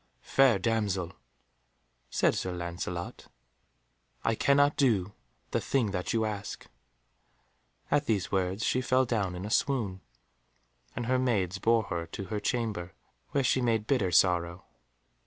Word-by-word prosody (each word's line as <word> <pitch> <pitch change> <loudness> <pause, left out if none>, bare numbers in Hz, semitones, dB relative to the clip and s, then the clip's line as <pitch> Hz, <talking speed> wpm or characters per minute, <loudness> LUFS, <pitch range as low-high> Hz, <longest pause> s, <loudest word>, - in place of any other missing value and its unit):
"Fair 135 -6 +4
damsel," 100 -5 -1 1.0
said - - +2
Sir 95 - -2
Lancelot, 85 0 -5 1.0
"I 115 - +2
cannot 145 +5 +3
do 105 -8 +2 0.4
the - - 0
thing 120 -7 0
that 90 -2 -2
you 110 -1 +1
ask." 105 -2 -5 1.3
At 145 -1 +2
these 105 -6 0
words 95 +2 0
she 130 - +1
fell 130 +1 +2
down 100 -7 -1
in 90 +2 -5
a 105 - -5
swoon, 110 -9 0 0.9
and 120 - -3
her 130 +2 +2
maids 100 -7 0
bore 115 +2 +3
her 85 -5 -4
to 95 - -6
her 105 - 0
chamber, 105 -5 -2 0.4
where 140 - 0
she 130 0 +2
made 115 -3 +1
bitter 110 -7 +1
sorrow. 90 0 +2
105 Hz, 140 wpm, -29 LUFS, 90-125 Hz, 1.3 s, Fair